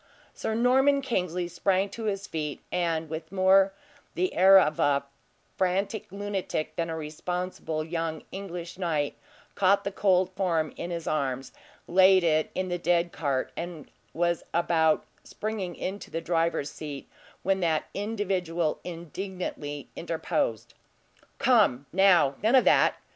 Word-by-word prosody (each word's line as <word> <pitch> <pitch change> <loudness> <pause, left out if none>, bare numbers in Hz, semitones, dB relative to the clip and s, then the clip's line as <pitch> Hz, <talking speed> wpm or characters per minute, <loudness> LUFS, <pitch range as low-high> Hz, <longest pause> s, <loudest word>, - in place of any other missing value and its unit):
Sir 220 - -3
Norman 265 +4 +4
Kingsley 180 -8 -1
sprang 185 +3 +1
to 225 +3 -6
his 200 -1 -2
feet, 150 -3 -4
and 165 -2 0
with 160 +1 -6
more 190 0 +5 0.4
the 185 +1 0
air 190 +2 +7
of 155 -4 +1
a 140 -1 +2 0.5
frantic 190 +2 -1
lunatic 200 -5 -3
than 165 -1 -2
a 160 - -3
responsible 160 +1 -4
young 165 -1 -3
English 180 -2 -7
knight, 155 -5 -1 0.4
caught 200 0 +3
the 200 - -2
cold 185 -2 +2
form 170 -5 0
in 175 - -5
his 170 -2 -4
arms, 135 -3 -2 0.4
laid 185 +1 +6
it 155 -2 +2
in 185 0 -1
the 175 -1 -2
dead 175 0 +1
cart, 140 -4 -1
and 170 -4 -7 0.2
was 170 0 0
about 165 -2 +2 0.2
springing 205 -5 -4
into 195 +2 -5
the 165 - -3
driver's 165 -3 0
seat, 145 -3 -7 0.4
when 190 +1 +1
that 165 -3 +1
individual 185 -6 -1
indignantly 170 -4 -6
interposed. 120 -8 -2 0.6
"Come, 125 +3 +3
now; 180 -7 +5
none 225 +5 +4
of 260 - +5
that! - - +5
175 Hz, 135 wpm, -27 LUFS, 160-190 Hz, 0.6 s, air